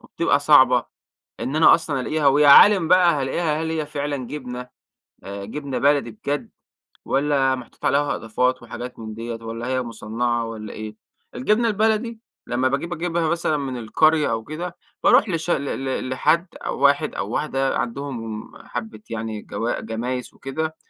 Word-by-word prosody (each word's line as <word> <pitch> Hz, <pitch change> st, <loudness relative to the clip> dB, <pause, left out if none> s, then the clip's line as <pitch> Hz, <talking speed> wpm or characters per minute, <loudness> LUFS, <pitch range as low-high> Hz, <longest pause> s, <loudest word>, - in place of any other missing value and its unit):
وبتبقى 165 Hz, -4 st, 0 dB
صعبة 130 Hz, -4 st, +5 dB, 0.5 s
إن 140 Hz, -, -3 dB
أنا 160 Hz, -, +7 dB
أصلًا 140 Hz, -4 st, -3 dB
ألاقيها، 150 Hz, +2 st, 0 dB
و 140 Hz, +1 st, +5 dB
يا 150 Hz, -, +6 dB
عالم 180 Hz, +4 st, +8 dB
بقى 180 Hz, -1 st, +5 dB
هالاقيها، 155 Hz, +3 st, -1 dB
هل 160 Hz, -, -2 dB
هي 155 Hz, -2 st, -2 dB
فعلًا 145 Hz, -1 st, -3 dB
جبنة، 125 Hz, -3 st, -7 dB, 0.6 s
آآ، 100 Hz, 0 st, -6 dB
جبنة 140 Hz, +5 st, -4 dB
بلدي 140 Hz, -4 st, +2 dB
بجد، 140 Hz, +7 st, -4 dB, 0.6 s
والّا 135 Hz, -1 st, +2 dB
محطوط 125 Hz, -3 st, -10 dB
عليها 145 Hz, +1 st, +2 dB
إضافات 125 Hz, +3 st, -1 dB
وحاجات 120 Hz, +1 st, -8 dB
من 110 Hz, -1 st, -7 dB
ديَّة؟ 115 Hz, +1 st, -5 dB
والّا 115 Hz, +1 st, -5 dB
هي 130 Hz, 0 st, 0 dB
مُصنَّعة 115 Hz, +1 st, -2 dB
والّا 110 Hz, -2 st, -7 dB
إيه؟ 110 Hz, 0 st, -7 dB, 0.4 s
الجبنة 215 Hz, -, +2 dB
البلدي 220 Hz, +2 st, 0 dB, 0.3 s
لما 125 Hz, +2 st, +1 dB
باجيب 155 Hz, +6 st, -2 dB
أجيبها 170 Hz, -1 st, -1 dB
مثلًًا 165 Hz, -2 st, 0 dB
من 135 Hz, -3 st, -4 dB
القرية 155 Hz, +6 st, +2 dB
أو 115 Hz, -1 st, -2 dB
كده، 170 Hz, +5 st, -6 dB, 0.3 s
باروح 210 Hz, -, +5 dB
لش 165 Hz, -1 st, -1 dB
ل 140 Hz, -, +1 dB, 0.2 s
ل 130 Hz, -1 st, -2 dB
لحد 155 Hz, +7 st, +2 dB, 0.2 s
أو -, -, -3 dB
واحد 140 Hz, +2 st, +3 dB
أو 100 Hz, -, -3 dB
واحدة 135 Hz, +1 st, -1 dB
عندهم 115 Hz, -4 st, -4 dB, 0.2 s
حبة 110 Hz, -3 st, -6 dB
يعني 110 Hz, -1 st, -4 dB
جوا 115 Hz, +4 st, -3 dB
جمايس 125 Hz, +2 st, -4 dB
وكده، 160 Hz, +4 st, -4 dB
135 Hz, 160 wpm, -22 LUFS, 120-155 Hz, 0.6 s, عالم